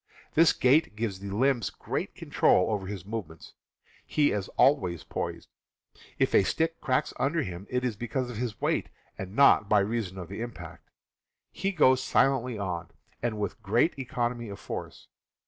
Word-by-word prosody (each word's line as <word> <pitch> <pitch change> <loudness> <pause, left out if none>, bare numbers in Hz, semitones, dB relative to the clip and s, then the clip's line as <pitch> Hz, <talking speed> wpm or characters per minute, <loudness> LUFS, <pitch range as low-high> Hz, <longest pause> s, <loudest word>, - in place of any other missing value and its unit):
This 165 0 +6
gait 130 -2 +3
gives 105 -4 -3
the 100 0 -6
limbs 120 0 +1
great - - -4
control 90 - +2
over 100 -3 -2
his 95 -3 -6
movements. 100 -7 -7 0.5
He 145 -1 +2
is 100 -2 -2
always 90 - +3
poised. - - -5 0.7
If - - +1
a - - +7
stick 165 - -1
cracks 130 -4 0
under 160 +3 +1
him 95 +1 -7
it 125 0 -1
is 120 -4 -1
because 120 +2 -3
of 115 - -7
his 115 -2 -3
weight, - - 0 0.3
and 95 +1 -7
not 140 -6 +5
by 105 -2 +5
reason 100 -2 -2
of 90 -2 -6
the 100 +3 -6
impact. 90 -8 -8 0.6
He 195 +1 -2
goes 130 -8 +4
silently 130 -3 +2
on, 90 -4 -4 0.3
and 115 -2 -1
with 105 -2 -3
great 120 - +2
economy 120 -4 -2
of 100 - -8
force. - - -7
115 Hz, 165 wpm, -28 LUFS, 95-130 Hz, 0.7 s, a